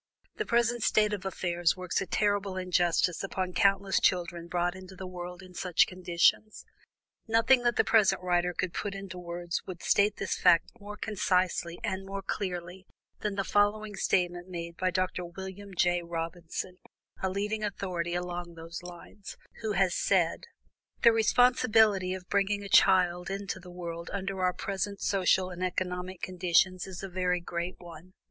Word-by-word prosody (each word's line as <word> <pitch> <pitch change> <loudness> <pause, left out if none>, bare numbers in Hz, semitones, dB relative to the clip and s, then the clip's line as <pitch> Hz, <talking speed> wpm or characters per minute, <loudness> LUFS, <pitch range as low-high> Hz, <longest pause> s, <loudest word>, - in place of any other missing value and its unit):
The 430 - -2
present 235 0 +2
state 210 -1 +3
of 195 -2 -4
affairs 175 -2 0
works 185 0 -1
a 195 - -4
terrible 205 -2 0
injustice 180 -1 +1
upon 190 -3 -3
countless 195 0 +3
children 170 -2 0
brought 175 0 0
into 190 0 -11
the 185 - -7
world 180 0 -7
in 185 -1 -14
such 180 -1 +3
conditions. 185 +3 +1 0.6
Nothing 230 +3 +4
that 240 -1 +1
the - - +4
present 215 -4 +4
writer 180 0 +1
could 180 0 -3
put 200 -1 -3
into 195 -2 -7
words 175 0 -4
would 180 -2 -7
state 205 +1 +3
this 195 - -2
fact 165 - +4
more 210 0 -8
concisely 185 -5 0
and 195 0 -3 0.2
clearly 180 -1 -4 0.3
than 210 -2 -2
the 195 - 0
following 205 +1 +1
statement 175 -2 0
made 170 -1 -6
by 185 +1 0
Dr. 185 0 -1
Wm. 190 +2 -8
J. 175 0 +3
Robinson, 170 +2 -5 0.4
a 190 - 0
leading 210 +3 -2
authority 180 -4 -2
along 175 -1 -4
these 165 0 -8
lines, 180 +3 -10 0.2
who 220 -2 -1
has 190 -2 +2
said: 180 -4 +1 0.6
"The 235 - +8
responsibility 220 -4 +4
of 185 -1 -10
bringing 200 0 +1
a 200 - -7
child 180 -3 +4
into 195 -1 -4
the 180 0 -13
world 170 -1 -6
under 195 -1 -3
our 180 0 +2
present 200 +1 -3
social 185 -1 +2
and 180 0 -5
economic 180 0 -3
conditions 185 0 +1
is 185 -1 -8
a - - -3
very 180 -1 0
great 175 +1 -4
one. 175 +1 -13
185 Hz, 160 wpm, -29 LUFS, 175-200 Hz, 0.6 s, The